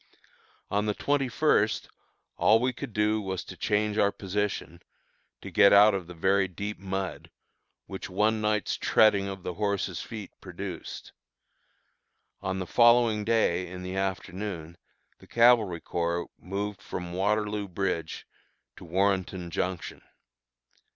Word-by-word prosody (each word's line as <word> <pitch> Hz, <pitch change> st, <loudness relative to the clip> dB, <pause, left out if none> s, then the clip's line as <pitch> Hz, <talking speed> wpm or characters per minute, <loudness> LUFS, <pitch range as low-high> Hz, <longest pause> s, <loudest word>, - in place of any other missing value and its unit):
On 105 Hz, +1 st, +1 dB
the 105 Hz, -, 0 dB
twenty 140 Hz, -2 st, 0 dB
first, 120 Hz, -5 st, +2 dB, 0.5 s
all 110 Hz, +1 st, +4 dB
we 125 Hz, +2 st, 0 dB
could 135 Hz, 0 st, -7 dB
do 105 Hz, +1 st, +1 dB
was 95 Hz, -2 st, -4 dB
to -, -, -10 dB
change 105 Hz, 0 st, 0 dB
our 100 Hz, -, +4 dB
position, 100 Hz, -4 st, -3 dB, 0.6 s
to -, -, -8 dB
get 100 Hz, -, +6 dB
out 105 Hz, +1 st, +7 dB
of 95 Hz, -3 st, -3 dB
the 90 Hz, -, -10 dB
very 95 Hz, +3 st, +2 dB
deep 100 Hz, +3 st, -6 dB
mud, 95 Hz, -1 st, -4 dB, 0.6 s
which 95 Hz, 0 st, -7 dB
one 110 Hz, +4 st, +1 dB
night's 105 Hz, -1 st, 0 dB
treading 100 Hz, -3 st, +4 dB
of 95 Hz, -2 st, -6 dB
the 90 Hz, -, -4 dB
horses' 100 Hz, -3 st, -2 dB
feet 100 Hz, +3 st, -8 dB
produced. -, -, -7 dB, 1.3 s
On 95 Hz, -1 st, -2 dB
the 95 Hz, -, -3 dB
following 120 Hz, 0 st, +4 dB
day 105 Hz, -5 st, +1 dB
in 90 Hz, +1 st, -8 dB
the 90 Hz, +1 st, -5 dB
afternoon 95 Hz, -3 st, -4 dB, 0.4 s
the -, -, -17 dB
Cavalry 115 Hz, -8 st, +4 dB
Corps 85 Hz, 0 st, -2 dB
moved 100 Hz, +2 st, -4 dB
from 90 Hz, -1 st, -6 dB
Waterloo 105 Hz, +2 st, 0 dB
Bridge 85 Hz, -4 st, -3 dB, 0.5 s
to -, -, -11 dB
Warrenton 95 Hz, -1 st, 0 dB
Junction. 90 Hz, 0 st, -3 dB
100 Hz, 135 wpm, -28 LUFS, 90-105 Hz, 1.3 s, out